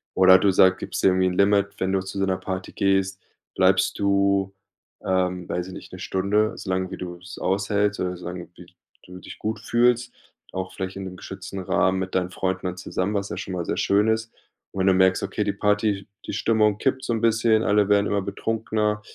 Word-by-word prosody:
oder 95 0 +7
du 100 +1 +3
sag 95 0 +5
gibst - - -4
dir - - +6
irgendwie 95 0 +2
'n 90 - 0
Limit: 100 +1 +3
Wenn 95 0 0
du 95 - +1
zu 95 +1 -6
so 95 - +2
'ner 95 -1 0
Party 95 0 -5
gehst, 95 -1 +1 0.4
bleibst 95 0 +2
du, 100 -1 +2 0.5
ähm, 90 -1 0
weiß 90 +1 -2
ich 95 - -9
nicht, - - -10
'ne - - -8
Stunde, 105 +3 0
so 95 - -7
lange 95 0 -1
wie 95 - -5
du 90 -1 -6
es 90 0 -11
aushältst 100 +2 0
oder 90 0 -2
so 90 - -11
lange 90 0 -6
wie 90 - -13
d - - -23 0.3
du 90 0 -11
dich - - -11
gut 110 0 -3
fühlst, 120 +1 +1 0.4
auch 95 0 -4
vielleicht 95 0 -5
in 95 - -5
'nem 90 0 -8
geschützten 95 +1 -8
Rahmen 95 +1 +1
mit 95 0 -4
deinen 90 -1 +1
Freunden 95 0 -2
dann 90 - -5
zusammen, 90 +2 -2
was 100 0 -2
ja - - -5
schon 95 - -5
mal 90 -2 -3
sehr - - -2
schön 105 +2 +2
ist. 110 +1 -1 0.4
Wenn 95 0 0
du 95 - +6
merkst, 95 0 +3
okay, 105 - -2
die 100 -1 -1
Party, 105 -1 0 0.2
die - - -4
Stimmung 110 -2 +2
kippt 130 0 0
so - - -2
'n 115 - -2
bisschen, 115 -1 +3
alle 105 -1 +2
werden 100 0 +4
immer 100 -1 0
betrunkener, 105 0 -1
95 Hz, 225 wpm, -24 LUFS, 95-105 Hz, 0.5 s, oder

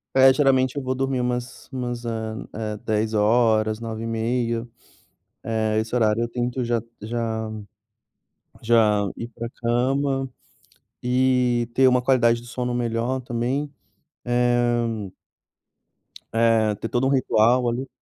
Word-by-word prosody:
É, 130 0 +7
geralmente 130 -2 +2
eu 140 - -2
vou 130 0 -2
dormir 135 -1 -1
umas 125 0 -4
umas, 120 -2 -4
eh 120 - -3 0.5
eh, 105 -1 -4
22h, 110 0 +2
21h30, 115 +1 -2 0.8
eh, 110 -1 0
esse 110 +2 -2
horário 110 -2 +2
eu 120 - -1
tento 125 +1 -2
já 120 -1 0 0.2
já 110 0 -3 1.1
já 110 -3 +3
ir 115 - -5
pra 115 0 -6
cama 135 +3 0 0.8
e 125 -1 +2
ter 130 0 +5
uma 125 0 +4
qualidade 120 -2 +3
de 120 - -13
sono 125 0 -3
melhor 120 +2 -1
também, 125 +5 -2 0.5
eh 120 -3 +1 1.2
eh, 115 -2 +3
ter 115 - -3
todo 125 +2 +1
um - - +2
ritual 125 -2 +3
ali 125 +3 -3
120 Hz, 125 wpm, -23 LUFS, 115-125 Hz, 1.2 s, É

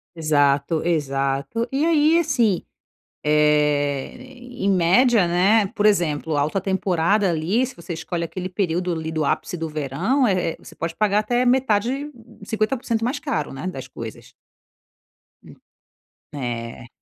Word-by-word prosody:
Exato, 145 -1 +2
exato. 140 - -1
E 275 +3 +1
aí, 320 0 +4
assim, 240 - +1 0.6
eh, 150 - +2 0.2
em 245 -5 -3
média, 195 +4 +4
né, 195 +5 +3
por 205 +2 0
exemplo, 160 -6 +1
alta 150 +7 0
temporada 190 +1 +1
ali, 175 +10 +1
se 255 - -9
você 170 +1 -8
escolhe 170 +1 -4
aquele 180 +3 -5
período 180 -2 -1
ali 160 -1 -4
do 155 -1 -1
ápice 180 - -1
do 165 -1 -4
verão, 155 - 0
eh 185 -4 +1
eh, - - -12
você - - -14
pode 165 0 -4
pagar 210 -1 +2
até 240 +3 0
metade, 255 +3 +1 0.3
50% 225 +1 -1
mais 255 +5 -1
caro, 155 - -3
né, 135 +6 -6
das 185 - -6
coisas. - - -9 1.1
Hu - - -15 0.8
é. 120 -3 -5
180 Hz, 140 wpm, -22 LUFS, 150-225 Hz, 1.1 s, aí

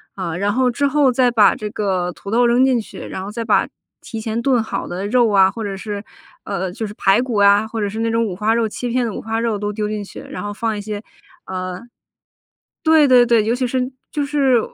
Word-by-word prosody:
啊， 175 -3 -4
然 205 +2 0
后 255 0 +2
之 280 +4 0
后 280 -2 +3
再 250 0 +3
把 215 -4 +5
这 210 - -5
个 185 -4 -1
土 200 - -10
豆 240 +3 +3
扔 240 +2 +4
进 260 -3 +3
去， 215 - -9
然 190 - -6
后 205 - -6
再 230 +1 -4
把 220 - +2 0.3
提 225 -1 -7
前 225 +1 -2
炖 255 -4 +3
好 220 - -4
的 185 +3 -4
肉 240 +1 +3
啊， 190 -1 +5
或 225 +2 -6
者 200 -1 -3
是， 205 +1 -5 0.4
呃， 190 -2 -3
就 220 +4 -4
是 210 - -7
排 195 0 +3
骨 245 -4 -2
啊， 200 +2 +5
或 220 -1 -4
者 205 - 0
是 215 - -7
那 230 0 0
种 230 0 +1
五 195 -5 -3
花 215 +3 +1
肉 230 -1 +1
切 245 +3 -4
片 250 +1 +1
的 225 - -2
五 - - -6
花 225 0 -3
肉 230 -3 0
都 205 0 -3
丢 210 0 -2
进 210 -1 -3
去， - - -10
然 - - -6
后 205 0 -4
放 220 0 -2
一 - - -4
些 210 0 -5
呃， 205 - -10 1.8
对 315 -3 +5
对 250 -1 +7
对， 230 -2 +3
尤 225 +3 0
其 255 0 -1
是 255 +1 -1 0.2
就 290 -2 -1
是 270 -5 +3
220 Hz, 270 characters per minute, -19 LUFS, 205-245 Hz, 1.8 s, 对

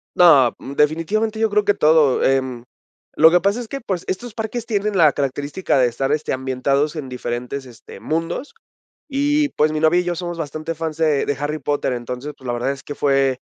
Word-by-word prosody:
No, 145 -9 +6
mm, 135 - -8
definitivamente 180 +10 0
yo 225 -1 +2
creo 210 +1 +2
que 205 0 +3
todo. 155 -7 +3
Em, 130 -3 0 0.5
lo 160 +1 +7
que 180 - +5
pasa 200 +5 0
es 230 - -8
que, 275 - -4
pues, 190 -5 -3
estos 235 +4 -4
parques 225 +1 -4
tienen 210 -2 -1
la 155 -4 +5
característica 145 +4 -1
de 125 -2 +4
estar, 135 +4 -2
este, 150 0 -1
ambientados 130 +3 0
en 145 -3 -5
diferentes, 125 +2 -5
este, 120 -5 -13
mundos. 165 - -3 0.6
Y, 290 +1 +1
pues, 155 +1 +1
mi 155 - -2
novia 160 +3 +4
y - - -3
yo 175 0 -1
somos 175 0 -5
bastante 155 +1 -4
fans 160 -1 -4
de 155 -3 +1
de 145 - 0
Harry 145 +3 -3
Potter. 145 -2 -1
Entonces, 125 +4 -6
pues, 130 - -14
la 120 - -1
verdad 120 +2 -1
es 140 0 -6
que 145 - -6
fue, 135 -2 +1
155 Hz, 210 wpm, -20 LUFS, 135-180 Hz, 0.6 s, lo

